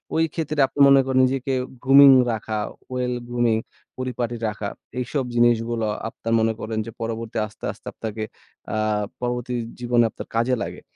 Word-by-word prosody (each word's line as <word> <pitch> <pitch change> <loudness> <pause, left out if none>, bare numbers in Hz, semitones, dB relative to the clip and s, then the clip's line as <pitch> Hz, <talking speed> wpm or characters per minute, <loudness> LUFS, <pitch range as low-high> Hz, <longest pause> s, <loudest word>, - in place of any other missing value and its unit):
ওই 160 - +3
ক্ষেত্রে 155 -2 -3
আপনি 145 - -10
মনে 135 0 +7
করেন 130 -1 +2
নিজেকে 135 +1 -1 0.3
গ্রুমিং 135 +1 +9 0.2
রাখা, 110 -1 -3 0.3
ওয়েল 125 -1 -1
গ্রুমিং, 120 -2 +1 0.4
পরিপাটি 125 -2 -3
রাখা। 105 -1 -3 0.3
এইসব 130 +3 -1
জিনিসগুলো 120 -1 +2 0.2
আপনার 115 0 -4
মনে 110 0 +2
করেন 110 0 -4
যে, 115 - -7
পরবর্তী 115 0 -4
আস্তে, 110 - -10
আস্তে - - -15
আপনাকে 110 -1 -5 0.5
আ - - 0 0.5
পরবর্তী 125 0 -2 0.3
জীবনে 120 -1 +3
আপনার - - -9
কাজে 120 +3 +2
লাগে। - - -7
120 Hz, 155 wpm, -23 LUFS, 115-130 Hz, 0.5 s, গ্রুমিং